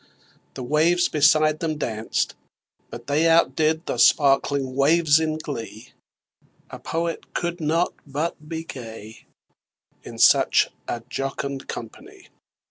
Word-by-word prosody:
The 130 Hz, -, -6 dB
waves 165 Hz, +7 st, +2 dB
beside 155 Hz, +1 st, +3 dB
them 160 Hz, -2 st, -2 dB
danced; 110 Hz, -6 st, -2 dB, 0.6 s
but 120 Hz, 0 st, -10 dB
they 150 Hz, +4 st, +1 dB
Out 165 Hz, +1 st, +3 dB
did 160 Hz, +1 st, 0 dB
the 120 Hz, -, -3 dB
sparkling 135 Hz, 0 st, +3 dB
waves 155 Hz, +2 st, +4 dB
in 155 Hz, -1 st, -1 dB
glee: 115 Hz, -6 st, -7 dB, 0.8 s
A -, -, -8 dB
Poet 165 Hz, 0 st, -4 dB
could 175 Hz, 0 st, -3 dB
not 165 Hz, +3 st, 0 dB
but 150 Hz, +2 st, -4 dB
be 160 Hz, -1 st, -4 dB
gay 115 Hz, -7 st, -10 dB, 0.7 s
In -, -, -11 dB
such -, -, +4 dB, 0.2 s
a 120 Hz, -, -4 dB
jocund 135 Hz, +1 st, -4 dB
company! 115 Hz, -2 st, -10 dB
150 Hz, 125 wpm, -23 LUFS, 130-160 Hz, 0.8 s, waves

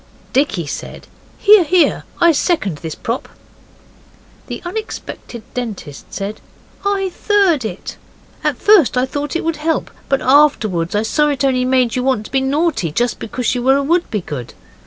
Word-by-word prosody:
Dicky 250 Hz, -, +1 dB
said, 145 Hz, -, -7 dB, 0.3 s
'Hear! 420 Hz, -3 st, +7 dB
hear! 345 Hz, +2 st, +2 dB
I 340 Hz, -1 st, +6 dB
second 270 Hz, -, 0 dB
this 160 Hz, 0 st, -6 dB
prop.' 230 Hz, +3 st, -4 dB, 1.2 s
The -, -, -5 dB
unexpected 350 Hz, -, -6 dB
Dentist 215 Hz, -, -6 dB
said, 200 Hz, +2 st, -5 dB, 0.4 s
'I 390 Hz, -2 st, 0 dB
third 390 Hz, -, +2 dB
it. 200 Hz, -4 st, -6 dB, 0.5 s
At -, -, 0 dB
first 390 Hz, -, +4 dB
I 250 Hz, -, +3 dB
thought 290 Hz, +3 st, -4 dB
it 340 Hz, -, -1 dB
would 330 Hz, -1 st, -1 dB
help, 320 Hz, +2 st, -1 dB, 0.2 s
but 275 Hz, -, +2 dB
afterwards 220 Hz, -, +3 dB
I 210 Hz, -, +2 dB
saw 295 Hz, +7 st, +2 dB
it 285 Hz, -1 st, 0 dB
only 255 Hz, -2 st, +2 dB
made 255 Hz, -3 st, +2 dB
you 250 Hz, -, 0 dB
want 255 Hz, -5 st, 0 dB
to -, -, -11 dB
be 265 Hz, 0 st, +2 dB
naughty, 280 Hz, -, 0 dB
just 240 Hz, +9 st, 0 dB
because 245 Hz, +2 st, -2 dB
you 245 Hz, -, -2 dB
were 265 Hz, +2 st, +4 dB
a 280 Hz, -, 0 dB
Wouldbegood. 210 Hz, -, -2 dB
265 Hz, 160 wpm, -18 LUFS, 220-325 Hz, 1.2 s, Hear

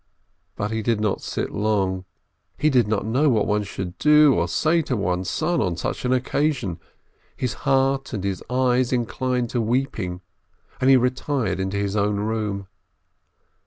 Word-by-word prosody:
But 105 Hz, +1 st, -3 dB
he 110 Hz, 0 st, -1 dB
did 110 Hz, 0 st, 0 dB
not 105 Hz, -2 st, 0 dB
sit -, -, -3 dB
long, 95 Hz, -3 st, 0 dB, 0.5 s
he 155 Hz, +1 st, +2 dB
did 125 Hz, -5 st, +3 dB
not 105 Hz, -1 st, -1 dB
know 130 Hz, +7 st, +2 dB
what 110 Hz, -5 st, +2 dB
one 105 Hz, 0 st, +1 dB
should 95 Hz, -3 st, -6 dB
do 150 Hz, -1 st, +6 dB
or 85 Hz, -4 st, +1 dB
say 160 Hz, -, +2 dB
to 130 Hz, -5 st, -2 dB
one's 90 Hz, -1 st, -1 dB
son 170 Hz, +2 st, 0 dB
on 85 Hz, -2 st, -1 dB
such 85 Hz, -, -3 dB
an 125 Hz, -, +1 dB
occasion; 130 Hz, -, 0 dB, 0.6 s
his 125 Hz, -, -2 dB, 0.2 s
heart 135 Hz, 0 st, +2 dB
and 105 Hz, -7 st, -4 dB
his 100 Hz, -2 st, -2 dB
eyes 125 Hz, 0 st, +2 dB
inclined 125 Hz, 0 st, -1 dB
to 120 Hz, -, 0 dB
weeping, 110 Hz, -7 st, -1 dB, 0.6 s
and 130 Hz, -, +3 dB
he 135 Hz, -, +8 dB
retired 125 Hz, -3 st, 0 dB
into 95 Hz, +1 st, -2 dB
his 100 Hz, 0 st, -1 dB
own 105 Hz, 0 st, +1 dB
room. 105 Hz, -2 st, -2 dB
110 Hz, 165 wpm, -23 LUFS, 100-130 Hz, 0.6 s, he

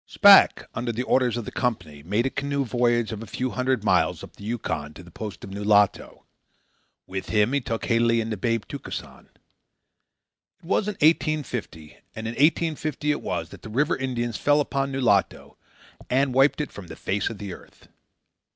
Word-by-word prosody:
Shpack, 200 Hz, -1 st, +7 dB
under 120 Hz, 0 st, -2 dB
the 120 Hz, +2 st, -3 dB
orders 125 Hz, -2 st, +2 dB
of 120 Hz, -, -4 dB
the -, -, -6 dB
Company, 90 Hz, -, -3 dB
made 105 Hz, -, 0 dB
a 135 Hz, -, 0 dB
canoe 140 Hz, 0 st, -2 dB
voyage 120 Hz, -1 st, +1 dB
of 110 Hz, -1 st, -6 dB
a 115 Hz, -, -8 dB
few 130 Hz, +5 st, -3 dB
hundred 130 Hz, -3 st, 0 dB
miles -, -, +2 dB
up -, -, -12 dB
the -, -, -13 dB
Yukon 100 Hz, -9 st, -4 dB
to 90 Hz, -, -11 dB
the 85 Hz, -, -15 dB
post 105 Hz, +3 st, -7 dB
of 95 Hz, -, -8 dB
Nulato. 105 Hz, 0 st, +1 dB, 0.8 s
With 95 Hz, 0 st, -6 dB
him 105 Hz, +4 st, +2 dB
he 140 Hz, -, +1 dB
took 115 Hz, -2 st, -4 dB
Halie 115 Hz, 0 st, +2 dB
and 115 Hz, 0 st, -3 dB
the -, -, -1 dB
babe 115 Hz, +2 st, -1 dB
Tukesan. -, -, -8 dB
This -, -, -37 dB, 1.3 s
was 195 Hz, +4 st, 0 dB
in 210 Hz, -, -1 dB
1850, 130 Hz, -, -1 dB, 0.2 s
and 110 Hz, 0 st, -5 dB
in -, -, -2 dB
1850 150 Hz, +1 st, +1 dB
it 145 Hz, -, -2 dB
was -, -, -3 dB
that -, -, -13 dB
the -, -, -9 dB
river 135 Hz, +7 st, +1 dB
Indians 120 Hz, -4 st, -3 dB
fell 145 Hz, +1 st, +3 dB
upon 140 Hz, -1 st, -1 dB
Nulato 120 Hz, -8 st, 0 dB, 0.5 s
and 135 Hz, +1 st, +2 dB
wiped 135 Hz, +3 st, +3 dB
it 150 Hz, -, -5 dB
from 100 Hz, -3 st, -10 dB
the -, -, -9 dB
face 100 Hz, +1 st, -2 dB
of 115 Hz, -, -7 dB
the 100 Hz, -2 st, -6 dB
earth. -, -, -16 dB
120 Hz, 190 wpm, -25 LUFS, 105-135 Hz, 1.3 s, Shpack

